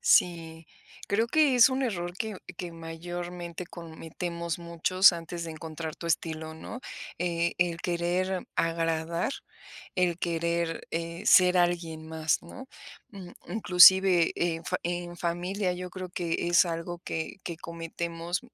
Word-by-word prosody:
Sí, 165 Hz, -2 st, +2 dB, 0.4 s
creo 220 Hz, +3 st, +2 dB
que 295 Hz, +1 st, +4 dB
es 245 Hz, -, +8 dB
un 260 Hz, +1 st, -1 dB
error 175 Hz, -8 st, -2 dB
que 220 Hz, -2 st, -3 dB, 0.2 s
que 175 Hz, 0 st, -5 dB
mayormente 175 Hz, +1 st, -6 dB
cometemos 170 Hz, 0 st, -5 dB
muchos 170 Hz, +3 st, +4 dB
antes 170 Hz, 0 st, -5 dB
de 165 Hz, -, -5 dB
encontrar 160 Hz, 0 st, -6 dB
tu 170 Hz, -, -7 dB
estilo, 160 Hz, -1 st, -2 dB
¿no? 225 Hz, +9 st, -8 dB, 0.4 s
Eh, 170 Hz, -1 st, 0 dB
el 175 Hz, -1 st, +1 dB
querer 180 Hz, +2 st, -1 dB
agradar, 165 Hz, +4 st, 0 dB, 0.6 s
el 180 Hz, -2 st, +1 dB
querer, 170 Hz, -1 st, -1 dB
eh, 170 Hz, +1 st, -4 dB
ser 180 Hz, 0 st, +6 dB
alguien 170 Hz, -2 st, 0 dB
más, 160 Hz, -1 st, 0 dB
¿no? 260 Hz, +10 st, -11 dB, 0.4 s
Mm, 190 Hz, -4 st, -10 dB, 0.2 s
inclusive, 185 Hz, -2 st, +6 dB
en 165 Hz, -1 st, -1 dB
fa -, -, -1 dB
en 175 Hz, 0 st, -3 dB
familia, 180 Hz, +3 st, -1 dB
yo 180 Hz, 0 st, -6 dB
creo 185 Hz, 0 st, -6 dB
que 170 Hz, -1 st, -2 dB
es 175 Hz, -, +6 dB
algo 170 Hz, +1 st, -4 dB
que 160 Hz, +2 st, -4 dB
que 170 Hz, -, -4 dB
cometemos, 170 Hz, +1 st, -4 dB
170 Hz, 135 wpm, -28 LUFS, 165-180 Hz, 0.6 s, es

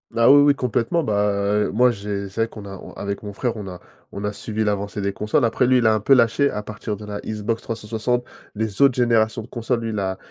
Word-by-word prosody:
Ah 115 Hz, +2 st, +6 dB
oui, 145 Hz, 0 st, +8 dB
oui, 145 Hz, 0 st, +5 dB
complètement, 125 Hz, +6 st, 0 dB
bah, 105 Hz, -1 st, +1 dB
moi, 125 Hz, +3 st, +4 dB
j'ai 100 Hz, -2 st, -4 dB
c'est 105 Hz, +4 st, -3 dB
vrai 115 Hz, -, +2 dB
qu'on 110 Hz, -2 st, -11 dB
a 95 Hz, -1 st, -8 dB
on -, -, -11 dB
avec 100 Hz, +1 st, -5 dB
mon 105 Hz, -1 st, -6 dB
frère, 120 Hz, +2 st, -2 dB
on 105 Hz, -2 st, -6 dB
a 90 Hz, -2 st, -8 dB, 0.3 s
on 100 Hz, -, -6 dB
a 105 Hz, -, -1 dB
suivi 110 Hz, +1 st, -3 dB
l'avancée 100 Hz, -1 st, -2 dB
des 100 Hz, 0 st, 0 dB
consoles. 105 Hz, +6 st, 0 dB
Après, 120 Hz, +2 st, +2 dB
lui, 130 Hz, 0 st, +4 dB
il 120 Hz, -, 0 dB
a 110 Hz, -, +5 dB
un 110 Hz, -, +1 dB
peu 110 Hz, +7 st, +4 dB
lâché 125 Hz, +3 st, +4 dB
à 105 Hz, -, -4 dB
partir 105 Hz, 0 st, -5 dB
de 105 Hz, -, -11 dB
la 105 Hz, -1 st, -5 dB
Xbox 110 Hz, +1 st, -3 dB
360. 115 Hz, +2 st, -2 dB, 0.3 s
Les 110 Hz, 0 st, -3 dB
autres 135 Hz, -3 st, +6 dB
générations 115 Hz, -2 st, +2 dB
de 110 Hz, -, -11 dB
console 120 Hz, 0 st, -2 dB
lui, 115 Hz, -, -3 dB
il 105 Hz, -2 st, -2 dB
a 95 Hz, -1 st, -2 dB
110 Hz, 255 wpm, -22 LUFS, 105-120 Hz, 0.3 s, oui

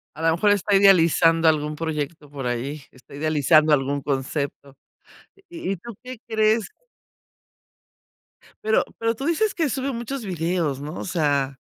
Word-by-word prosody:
A -, -, -8 dB
lo 165 Hz, 0 st, +3 dB
mejor 205 Hz, +4 st, +3 dB
está 205 Hz, 0 st, +2 dB
idealizando 165 Hz, -4 st, +5 dB
algún 150 Hz, -1 st, +1 dB
proyecto 150 Hz, -1 st, -4 dB
por 140 Hz, -3 st, -5 dB
ahí, 130 Hz, +5 st, -3 dB
está 130 Hz, +1 st, -19 dB
idealizando 155 Hz, +1 st, +3 dB
algún 140 Hz, 0 st, 0 dB
concepto, 140 Hz, 0 st, -3 dB, 0.7 s
¿y 335 Hz, -, -4 dB
y -, -, -3 dB
tú 230 Hz, +6 st, -10 dB
qué 255 Hz, 0 st, -8 dB
crees? 220 Hz, -1 st, +2 dB, 2.0 s
Pero 220 Hz, 0 st, +3 dB
pero 230 Hz, 0 st, 0 dB
tú 270 Hz, -, -6 dB
dices 340 Hz, +7 st, +1 dB
que 320 Hz, -4 st, 0 dB
sube 270 Hz, +2 st, -2 dB
muchos 240 Hz, +1 st, -5 dB
videos, 165 Hz, -5 st, -1 dB
¿no?, 150 Hz, +3 st, -6 dB
o -, -, -5 dB
sea 145 Hz, -6 st, 0 dB
165 Hz, 150 wpm, -23 LUFS, 145-215 Hz, 2.0 s, idealizando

